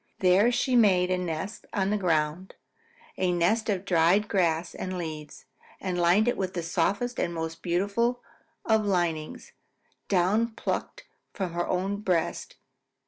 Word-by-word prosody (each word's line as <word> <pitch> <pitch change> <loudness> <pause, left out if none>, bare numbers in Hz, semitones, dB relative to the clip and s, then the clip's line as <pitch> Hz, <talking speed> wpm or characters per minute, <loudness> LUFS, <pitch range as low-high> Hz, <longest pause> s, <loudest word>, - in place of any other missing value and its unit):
There 190 +5 +4
she 250 +1 +1
made 185 -6 +4
a 185 - +2
nest 180 +4 -5
on 195 -2 0
the - - +2
ground, 165 -1 -1 0.6
a 185 -1 +2
nest 195 +6 +1
of 195 -2 -1
dried 180 +3 +3
grass 170 -4 0
and 185 0 -5
leaves, 155 -3 -7 0.3
and 185 -2 -3
lined 175 +6 +3
it 245 - +1
with 185 -1 -3
the 170 - -2
softest 200 +9 -1
and 170 - 0
most 165 -1 -5
beautiful 205 +8 0 0.4
of 220 -1 +3
linings, 175 -6 -2 0.6
down 205 +5 +2
plucked - - -4 0.3
from 185 -4 -4
her 175 0 -1
own 190 +2 -1
breast. 180 -5 -2
185 Hz, 145 wpm, -27 LUFS, 170-205 Hz, 0.6 s, There